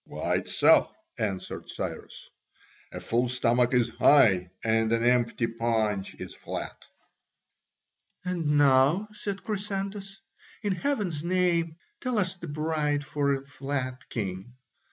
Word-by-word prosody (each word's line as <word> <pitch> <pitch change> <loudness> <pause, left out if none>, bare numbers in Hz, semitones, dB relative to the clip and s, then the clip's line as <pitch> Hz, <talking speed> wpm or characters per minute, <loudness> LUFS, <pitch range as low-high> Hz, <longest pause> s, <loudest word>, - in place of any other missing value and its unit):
"Quite - - -2
so," - - +5 0.3
answered 95 -3 -4
Cyrus, - - -7 0.6
"a - - -6
full 120 +2 0
stomach 120 0 +2
is 125 -2 +3
high 95 -11 +5
and 110 0 +2
an 115 0 +2
empty 120 -1 +2
paunch 110 -4 -1
is - - -8
flat." - - -6 1.5
"And 165 -5 0
now," 145 +8 +4
said 200 -2 -5
Chrysantas, 195 -1 -4 0.4
"in 205 -2 +1
heaven's 195 - -1
name, 170 -2 +1 0.2
tell 255 -3 -2
us 190 -2 +1
the 175 -2 -9
bride 150 -1 -1
for 140 -1 0
a 135 0 -2
flat 135 -2 -4
king?" 95 +1 -4
145 Hz, 120 wpm, -27 LUFS, 120-180 Hz, 1.5 s, so